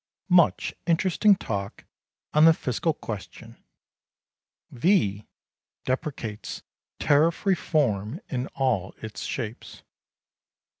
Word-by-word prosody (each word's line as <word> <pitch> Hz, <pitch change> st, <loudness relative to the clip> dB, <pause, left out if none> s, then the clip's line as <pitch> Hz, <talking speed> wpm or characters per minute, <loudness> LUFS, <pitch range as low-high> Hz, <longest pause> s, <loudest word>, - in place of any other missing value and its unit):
Much 175 Hz, -2 st, +4 dB
interesting 185 Hz, +4 st, +4 dB
talk 100 Hz, -, -5 dB, 0.5 s
on 150 Hz, +1 st, +6 dB
the 165 Hz, -1 st, +7 dB
Fiscal 130 Hz, +6 st, -1 dB
question. 110 Hz, -9 st, -9 dB, 1.1 s
V.... 120 Hz, -, +1 dB, 0.6 s
deprecates 130 Hz, -5 st, -4 dB, 0.3 s
Tariff 155 Hz, +5 st, +2 dB
Reform 145 Hz, -, +1 dB
in 130 Hz, -1 st, -3 dB
all 120 Hz, -9 st, 0 dB
its 110 Hz, -1 st, -8 dB
shapes. 110 Hz, +1 st, -6 dB
130 Hz, 85 wpm, -26 LUFS, 110-165 Hz, 1.1 s, the